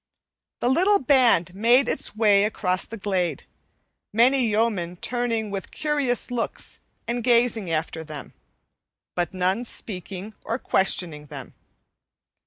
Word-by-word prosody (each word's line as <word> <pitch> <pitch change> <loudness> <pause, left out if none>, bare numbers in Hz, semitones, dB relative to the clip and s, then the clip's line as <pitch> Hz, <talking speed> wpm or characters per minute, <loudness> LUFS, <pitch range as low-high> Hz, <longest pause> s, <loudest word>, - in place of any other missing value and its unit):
The - - +1
little 370 +10 +4
band 250 - +3
made 235 +7 +4
its - - 0
way 205 -2 +4
across 185 -3 -1
the 230 - -7
glade, 185 - -1 0.7
many 245 +3 +4
yeomen 210 -5 0
turning 230 0 -2
with 195 -1 -5
curious 290 -5 -1
looks 240 -2 -3 0.3
and 240 0 -2
gazing 235 -5 +3
after 160 0 -2
them, 155 -2 -9 0.8
but 175 -2 -1
none 185 +5 0
speaking 195 -2 -5
or 230 - -2
questioning 170 - 0
them. - - -9
215 Hz, 120 wpm, -24 LUFS, 180-245 Hz, 0.8 s, little